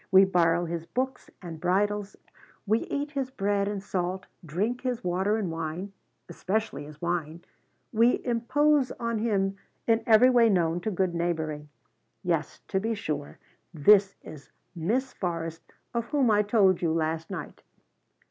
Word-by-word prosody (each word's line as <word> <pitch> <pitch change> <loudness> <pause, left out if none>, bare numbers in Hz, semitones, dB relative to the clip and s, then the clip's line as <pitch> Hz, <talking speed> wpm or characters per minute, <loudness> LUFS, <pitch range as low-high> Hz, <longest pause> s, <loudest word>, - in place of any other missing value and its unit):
We 190 +1 +8
borrow 175 -2 +2
his 170 0 -5
books 260 +2 -3
and 165 -3 -8
bridles; 205 +2 0 0.5
we 220 +2 +2
eat 290 +1 -3
his 270 -3 -2
bread 200 -4 0
and 200 -1 -3
salt, 185 -1 -2 0.2
drink 200 - -2
his 250 -2 -2
water 190 +4 +1
and 195 -6 -2
wine 165 +4 -4 0.3
especially 200 -7 -2
his 150 0 -12
wine 170 -1 -3 0.5
we 230 +3 +3
impose 260 +4 +2
on 230 -1 -2
him 195 -3 0 0.3
in 225 0 +3
every 230 +3 +7
way 235 -2 +5
known 175 -3 +1
to 215 - -2
good 185 -3 0
neighboring. 160 -3 -2 0.5
Yes, 165 -4 -1
to 190 - +1
be 225 +3 -1
sure, 150 -8 -4 0.4
this 195 +5 +5
is 150 -3 -11 0.3
Miss 235 +11 -1
Forrest 165 -2 -4 0.2
of 235 -1 -1
whom 270 -4 +2
I 210 0 +4
told 205 -4 +3
you 170 -2 +1
last 160 0 -1
night." 180 -6 -7
195 Hz, 150 wpm, -27 LUFS, 170-225 Hz, 0.5 s, We